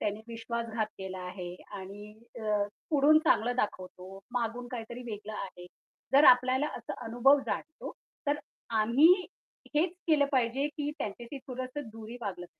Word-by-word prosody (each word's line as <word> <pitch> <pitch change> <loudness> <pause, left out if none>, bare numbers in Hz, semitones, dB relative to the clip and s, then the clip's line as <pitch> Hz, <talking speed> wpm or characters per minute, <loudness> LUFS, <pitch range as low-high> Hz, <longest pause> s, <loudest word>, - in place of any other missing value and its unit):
त्यांनी 210 +1 -1
विश्वासघात 230 -1 -2
केला 190 -1 -5
आहे 180 -1 -6 0.2
आणि 205 +2 -9 0.3
अ, 210 -1 +1 0.3
पुढून 300 +1 +6
चांगलं 245 +3 +3
दाखवतो. 185 -3 -3
मागून 245 0 -2
काहीतरी 240 0 -6
वेगळं 210 +1 -6
आहे. 180 -2 -7 0.5
जर 285 +2 +7
आपल्याला 255 +3 +6
असा 235 - -6
अनुभव 270 +5 +5
जाणवतो, 315 - -4 0.3
तर 290 +1 +2 0.4
आम्ही 245 +9 +6 0.7
हेच 330 +4 +3 0.2
केलं 295 -3 +5
पाहिजे, 260 +2 +2
की 295 -1 -3
त्यांच्याशी 235 +7 -5
थोडंसं 255 +1 -5
दुरीनं 225 +2 -9
वागलं. 180 -2 -5
235 Hz, 135 wpm, -30 LUFS, 210-270 Hz, 0.7 s, जर